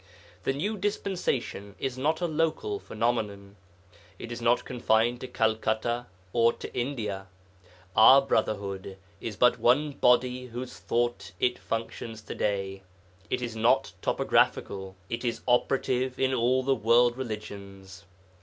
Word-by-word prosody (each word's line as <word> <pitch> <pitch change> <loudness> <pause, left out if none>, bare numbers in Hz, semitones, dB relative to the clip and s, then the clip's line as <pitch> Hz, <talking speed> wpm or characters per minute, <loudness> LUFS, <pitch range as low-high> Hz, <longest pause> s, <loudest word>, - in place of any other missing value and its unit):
The 135 - +2
New 205 +10 -2
Dispensation 180 - -2
is 135 -2 -3
not 155 +6 0
a - - +2
local 165 - -1
phenomenon; 105 - -2 0.6
it 115 - -8
is 120 - -5
not 120 +1 +2
confined 120 0 +1
to 130 - -5
Calcutta 110 +1 0 0.3
or 115 0 +4
to - - -9
India; 110 -7 -3 0.7
our 130 +5 +9
Brotherhood 100 -6 -2 0.2
is 110 0 -5
but 125 +2 +4
one 135 +6 +3
body 125 -1 +2
whose 125 +1 -7
thought 120 -5 -1
it 125 0 +1
functions 115 -1 -5
to - - -6
day; 95 -2 -2 0.5
it 125 - -1
is 115 -2 -4
not 120 +5 +2
topographical, 95 -1 +1
it 115 +4 -4
is 120 -1 -2
operative 125 +1 +1
in 130 0 +2
all 130 +1 +2
the 135 +1 +3
world 120 +1 +4
religions.' 100 -5 -7
120 Hz, 135 wpm, -28 LUFS, 110-130 Hz, 0.7 s, our